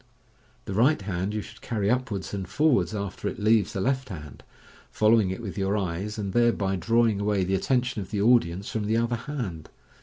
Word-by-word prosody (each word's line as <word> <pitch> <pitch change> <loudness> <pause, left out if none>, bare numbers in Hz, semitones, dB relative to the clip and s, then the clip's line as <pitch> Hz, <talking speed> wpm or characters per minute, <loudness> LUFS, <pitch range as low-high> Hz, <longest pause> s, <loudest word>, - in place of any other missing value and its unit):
The 100 - -4
right 125 +10 +3
hand 95 -1 -3
you 105 -1 -3
should - - -13
carry 105 -4 -2
upwards 115 -5 -1
and 95 -3 -3
forwards 145 -7 +2
after 100 -2 -4
it - - -3
leaves 105 -2 +2
the - - -3
left 130 +2 0
hand, 75 -7 -9 0.5
following 110 -2 +3
it 95 +5 -5
with 100 -1 -5
your 100 +2 +1
eyes, 95 +3 -3
and 100 -3 -3
thereby 115 -5 +2
drawing 115 +3 +2
away 100 -2 +1
the 95 +1 -1
atiention 125 +6 0
of 95 -2 -6
the 105 - -2
audience 100 -4 +2
from 110 -2 -2
the 110 +2 +1
other 120 +1 +1
hand. 115 - -5
105 Hz, 195 wpm, -26 LUFS, 95-115 Hz, 0.5 s, right